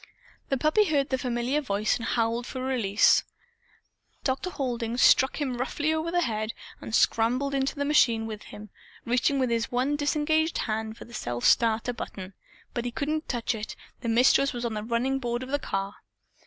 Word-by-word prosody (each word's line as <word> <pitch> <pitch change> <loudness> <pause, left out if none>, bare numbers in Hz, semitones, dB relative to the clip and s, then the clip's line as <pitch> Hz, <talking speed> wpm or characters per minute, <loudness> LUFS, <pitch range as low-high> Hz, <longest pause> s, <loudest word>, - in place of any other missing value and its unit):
The 270 - +1
puppy 310 - +3
heard 290 -5 +1
the 260 - +1
familiar 250 +3 -1
voice 210 -5 0
and 230 - -8
howled 230 +1 0
for 260 - -6
release. 240 -6 +3 1.0
Dr. 270 +7 -1
Halding 240 -6 -3
struck 265 +3 +5
him 260 -4 -2
roughly 295 +4 0
over 315 +1 -1
the 350 +1 +1
head 215 -2 -2 0.3
and 225 - -3
scrambled 250 +6 +2
into 270 0 0
the 285 -1 -1
machine 235 -6 +3
with 215 -1 -6
him, 210 -1 -11 0.3
reaching 245 +4 +2
with 255 -3 +1
his 230 -1 -1
one 255 +4 +1
disengaged 305 +2 +1
hand 220 0 -3
for - - -10
the 235 - -15
self 120 - -3
starter 230 +1 +3
button. 190 -4 -7 0.4
Before 240 -1 -3
he - - -3
could 305 +5 -2
touch 245 -1 -1
it, 220 -1 -6 0.2
the 235 - -3
Mistress 255 +4 +4
was 240 0 -4
on 230 - -2
the 210 - -3
running 240 +4 0
board 240 -1 -2
of 260 - -8
the 285 +1 0
car. 195 -5 -3
245 Hz, 185 wpm, -27 LUFS, 225-280 Hz, 1.0 s, struck